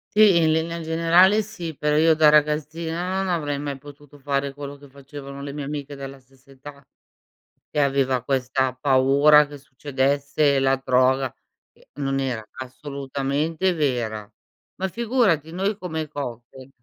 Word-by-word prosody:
Sì, 210 Hz, -4 st, +6 dB
in 160 Hz, -1 st, +3 dB
linea 165 Hz, +1 st, -1 dB
generale 170 Hz, +5 st, +4 dB
sì, 190 Hz, -7 st, -6 dB
però 150 Hz, +1 st, 0 dB
io, 160 Hz, +1 st, +5 dB
da 155 Hz, -1 st, +5 dB
ragazzina, 160 Hz, +4 st, +1 dB
non 190 Hz, -, -3 dB
avrei 145 Hz, -5 st, -1 dB
mai 140 Hz, -1 st, -5 dB
potuto 145 Hz, 0 st, -15 dB
fare 140 Hz, 0 st, -2 dB
quello 140 Hz, 0 st, -8 dB
che 140 Hz, -1 st, -17 dB
facevano 140 Hz, 0 st, -10 dB
le 140 Hz, 0 st, -6 dB
mie 145 Hz, -1 st, -5 dB
amiche 145 Hz, 0 st, -6 dB
della 135 Hz, 0 st, -8 dB
stessa 130 Hz, +1 st, -25 dB
età, 140 Hz, +1 st, -13 dB, 0.8 s
e -, -, -5 dB
aveva 135 Hz, -3 st, +1 dB
questa 130 Hz, 0 st, 0 dB
paura 140 Hz, +3 st, +4 dB
che 145 Hz, 0 st, -11 dB
succedesse 140 Hz, +1 st, 0 dB
la 135 Hz, 0 st, +3 dB
droga, 130 Hz, +1 st, +2 dB, 0.4 s
che -, -, -26 dB
non 135 Hz, -1 st, -1 dB
era 125 Hz, -5 st, -3 dB, 0.2 s
assolutamente 140 Hz, +6 st, -2 dB
vera. 120 Hz, -9 st, -2 dB, 0.5 s
Ma 190 Hz, -, 0 dB
figurati! 215 Hz, -, 0 dB
Noi 195 Hz, +4 st, -1 dB
come 160 Hz, -5 st, -4 dB
cocktail 130 Hz, -2 st, -8 dB
145 Hz, 145 wpm, -23 LUFS, 135-160 Hz, 0.8 s, Sì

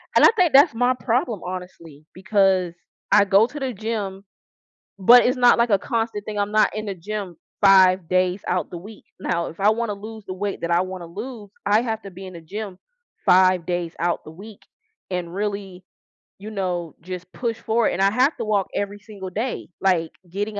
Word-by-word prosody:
And -, -, +7 dB
I -, -, +9 dB
think 355 Hz, -7 st, +3 dB
that's 275 Hz, -3 st, +7 dB
my 245 Hz, +2 st, +2 dB
problem, 245 Hz, -, -1 dB
honestly, 175 Hz, -5 st, -8 dB
because 185 Hz, -1 st, +1 dB, 0.4 s
I 205 Hz, -, +6 dB
go 200 Hz, +3 st, +4 dB
to 295 Hz, +4 st, -8 dB
the 265 Hz, -3 st, -3 dB
gym, 200 Hz, -2 st, -4 dB, 0.8 s
but 240 Hz, +6 st, +7 dB
it's 255 Hz, +2 st, +2 dB
not 245 Hz, -1 st, +5 dB
like 235 Hz, 0 st, +2 dB
a 200 Hz, -, +4 dB
constant 225 Hz, -2 st, -2 dB
thing, 210 Hz, -1 st, -5 dB
I'm 205 Hz, 0 st, -1 dB
not 215 Hz, 0 st, +3 dB
in 215 Hz, -, -4 dB
the 200 Hz, -, -3 dB
gym 190 Hz, 0 st, -6 dB, 0.3 s
5 190 Hz, -3 st, +6 dB
days 185 Hz, +1 st, +1 dB
out 180 Hz, -1 st, -1 dB
the 175 Hz, -, -6 dB
week. 210 Hz, +4 st, -13 dB, 0.2 s
Now, 170 Hz, -2 st, -1 dB
if 165 Hz, -, -10 dB
I 205 Hz, -, +5 dB
wanna 220 Hz, -1 st, -1 dB
lose 215 Hz, +1 st, -10 dB
the 185 Hz, -, -5 dB
weight 200 Hz, +1 st, -4 dB
that 170 Hz, -, -2 dB
I 170 Hz, +1 st, +3 dB
wanna 185 Hz, -2 st, -7 dB
lose, 210 Hz, +4 st, -8 dB, 0.2 s
I 210 Hz, +2 st, +4 dB
have 225 Hz, -2 st, -3 dB
to 195 Hz, -, -9 dB
be 190 Hz, +1 st, -10 dB
in 185 Hz, -, -10 dB
the 170 Hz, -, -9 dB
gym 195 Hz, +3 st, -7 dB, 0.5 s
5 185 Hz, -2 st, +4 dB
days 175 Hz, -2 st, -2 dB
out 170 Hz, 0 st, -1 dB
the -, -, -10 dB
week 200 Hz, +6 st, -12 dB, 0.5 s
and 180 Hz, -2 st, -3 dB
really, 200 Hz, -2 st, -4 dB, 0.6 s
you 210 Hz, +2 st, -8 dB
know, 180 Hz, -5 st, -3 dB
just 180 Hz, +1 st, -8 dB
push 230 Hz, -2 st, -3 dB
for 225 Hz, +1 st, +1 dB
it. -, -, -3 dB
And 185 Hz, -, -2 dB
I 195 Hz, +1 st, +4 dB
have 260 Hz, +7 st, +2 dB
to 230 Hz, -, -3 dB
walk 205 Hz, -3 st, +1 dB
every 205 Hz, 0 st, -3 dB
single 195 Hz, -2 st, -9 dB
day, 225 Hz, +7 st, -4 dB
like 175 Hz, -4 st, +1 dB, 0.2 s
getting 205 Hz, +3 st, -3 dB
200 Hz, 205 wpm, -22 LUFS, 185-220 Hz, 0.8 s, I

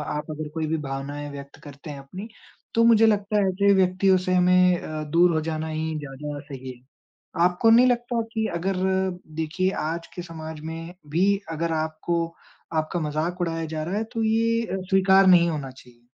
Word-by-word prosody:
आप 150 Hz, +1 st, -4 dB
अगर 155 Hz, 0 st, -5 dB
कोई 160 Hz, -1 st, -2 dB
भी 160 Hz, +1 st, 0 dB
भावनाएँ 140 Hz, +2 st, -5 dB
व्यक्त 140 Hz, 0 st, -10 dB
करते 145 Hz, +1 st, -11 dB
हैं 140 Hz, -1 st, -7 dB
अपनी, 185 Hz, +10 st, -9 dB, 0.5 s
तो 230 Hz, -, +4 dB
मुझे 225 Hz, -1 st, +6 dB
लगता 210 Hz, 0 st, +1 dB
है 195 Hz, -, +2 dB
ऐसे 200 Hz, +2 st, +3 dB
व्यक्तियों 185 Hz, 0 st, +3 dB
से 185 Hz, -, +2 dB
हमें 180 Hz, 0 st, +4 dB
अ, 155 Hz, 0 st, -5 dB
दूर 170 Hz, +3 st, +3 dB
हो 160 Hz, -, +1 dB
जाना 160 Hz, 0 st, -3 dB
ही 160 Hz, 0 st, -3 dB
ज़्यादा 145 Hz, +1 st, -6 dB
सही 135 Hz, -3 st, -8 dB
है। 125 Hz, -, -14 dB, 0.7 s
आपको 180 Hz, +6 st, +3 dB
नहीं 245 Hz, +3 st, +7 dB
लगता 240 Hz, -1 st, 0 dB
कि 220 Hz, -2 st, 0 dB
अगर 190 Hz, +3 st, -1 dB, 0.6 s
देखिए 165 Hz, +4 st, 0 dB, 0.2 s
आज 165 Hz, +1 st, -4 dB
के 180 Hz, -, -4 dB
समाज 160 Hz, -2 st, -8 dB
में 165 Hz, +2 st, -7 dB, 0.2 s
भी 170 Hz, +6 st, +2 dB, 0.3 s
अगर 165 Hz, +1 st, -2 dB
आपको 160 Hz, +2 st, -1 dB, 0.5 s
आपका 160 Hz, +2 st, -1 dB
मजाक 160 Hz, +3 st, -2 dB
उड़ाया 165 Hz, -1 st, -1 dB
जा 155 Hz, 0 st, -4 dB
रहा 175 Hz, +5 st, -3 dB
है 220 Hz, -, 0 dB
तो 225 Hz, -2 st, -1 dB
ये 230 Hz, +1 st, +2 dB
अ, 190 Hz, -2 st, -3 dB
स्वीकार 195 Hz, 0 st, +5 dB
नहीं 175 Hz, -2 st, +6 dB
होना 145 Hz, -5 st, -4 dB
चाहिए? 125 Hz, -2 st, -18 dB
165 Hz, 190 wpm, -24 LUFS, 155-190 Hz, 0.7 s, नहीं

